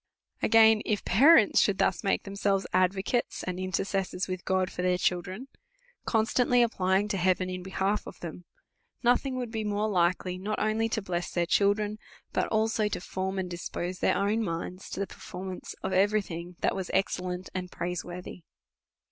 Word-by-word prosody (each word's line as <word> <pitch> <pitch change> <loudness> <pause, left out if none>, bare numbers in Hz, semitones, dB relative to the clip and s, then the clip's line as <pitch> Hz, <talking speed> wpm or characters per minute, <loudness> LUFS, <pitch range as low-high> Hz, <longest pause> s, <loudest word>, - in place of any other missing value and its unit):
Again; 220 -1 +6
If 210 -3 -1
parents 265 - +6
should 200 -2 +2
thus 185 - +1
make 195 - +1
themselves 200 -1 0
ad 185 +1 +3
vocates 220 +5 -1
and 180 0 -4
intercessors 185 0 -2
with 185 -1 -4
God 185 -1 +1
for - - -4
their 180 0 +2
children, 185 +7 -1 0.6
constantly 240 +2 +3
applying 195 -3 +1
to 200 - 0
heaven 185 0 +1
in 180 0 -4
behalf 190 +2 -1
of - - -10
them, 170 +1 -8 0.6
no 245 +1 +6
thing 270 -1 -3
would 245 -3 -4
be 220 -1 -2
more 210 0 0
likely, 180 -1 +1
not 210 +3 -2
only 220 +1 +1
to 220 -2 -2
bless 175 -2 -2
their 175 -1 0
children, 205 +3 +2 0.3
but - - +1
also 220 0 +1
to 210 - -3
form 190 +2 -3
and 185 -1 -3
dispose 175 +1 -4
their - - +2
own 210 +3 +1
minds 180 0 -5
to - - -5
the 200 - 0
performance 185 -1 -8
of - - -2
every 205 +2 +3
thing 175 0 -7
that - - +1
was 190 -2 -4
excellent 185 -1 -1
and 180 -1 -4
praiseworthy. 180 +1 -5
190 Hz, 175 wpm, -28 LUFS, 180-215 Hz, 0.6 s, Again